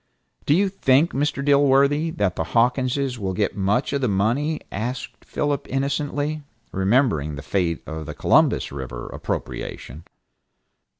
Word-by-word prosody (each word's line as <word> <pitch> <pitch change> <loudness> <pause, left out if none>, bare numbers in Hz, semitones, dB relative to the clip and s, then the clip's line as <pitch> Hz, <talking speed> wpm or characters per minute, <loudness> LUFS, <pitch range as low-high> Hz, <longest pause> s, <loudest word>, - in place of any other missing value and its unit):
"Do 145 - +5
you 200 +3 +3
think, 150 -4 +3
Mr. 140 0 -1
Dilworthy, 140 +2 +4
that 100 -4 +1
the - - -1
Hawkinses 125 +2 +1
will 95 -2 -2
get 105 +1 0
much 105 +8 0
of 140 - 0
the 125 - +2
money?" 120 +10 +1
asked 120 +5 -5
Philip 145 -2 -2
innocently, 145 +2 -1 0.3
remembering 95 - +1
the 70 - -8
fate 85 +1 -1
of 80 -1 -6
the 75 - -6
Columbus - - +3
River 65 -3 -6
appropriation. 75 +6 -5
125 Hz, 135 wpm, -23 LUFS, 95-145 Hz, 0.3 s, Do